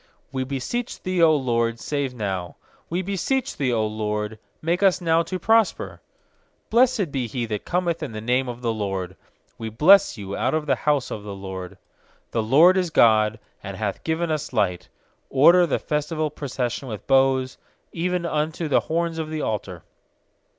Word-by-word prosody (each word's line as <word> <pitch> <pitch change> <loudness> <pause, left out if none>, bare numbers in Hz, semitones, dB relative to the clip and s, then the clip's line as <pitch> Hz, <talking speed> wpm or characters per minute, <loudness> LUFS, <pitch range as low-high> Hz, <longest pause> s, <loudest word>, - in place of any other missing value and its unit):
25We 130 -1 -2
beseech 185 - -4
Thee, 185 0 -2
0 165 -2 +6
LORD, 115 -4 0
save 140 -2 -3
now! 95 -6 -3 0.3
We 175 +3 -1
beseech 245 +8 -1
Thee, 140 -3 -1
0 115 -3 +1
LORD, 105 0 -3 0.2
make 170 +4 -1
us 190 -2 +4
now 165 -2 +2
to 185 +2 -4
prosper! 220 +3 +1 0.7
26Blessed 235 - +3
be 130 -4 -2
he 120 +2 -3
that 105 -2 -4
cometh 175 -2 -1
in 150 - -4
the 110 - -6
name 125 +3 0
of 120 0 -7
the 115 -1 0
LORD; 95 -3 -3 0.4
We 110 - -4
bless 185 - +5
you 100 -1 -5
out 130 +4 0
of 155 -1 -1
the 145 - +2
house 145 -3 0
of 105 - -4
the 100 -1 -7
LORD. 95 -2 -7 0.6
27The 110 -2 -1
LORD 170 +8 +6
is 180 -2 +1
God, 110 -6 +4 0.2
and 100 -1 -7
hath 105 -3 -3
given 160 +1 -1
us 155 -2 -2
light; 90 -2 0 0.4
Order 170 +6 +6
the - - +1
festival 150 +1 -2
procession 130 -3 -4
with 110 -4 -7
boughs, 135 -1 +2 0.3
even 180 +1 -1
unto 155 +1 -1
the 145 - +3
horns 165 0 -2
of 155 -1 -3
the 155 -1 -3
altar. 95 - -4
135 Hz, 175 wpm, -23 LUFS, 110-170 Hz, 0.7 s, 0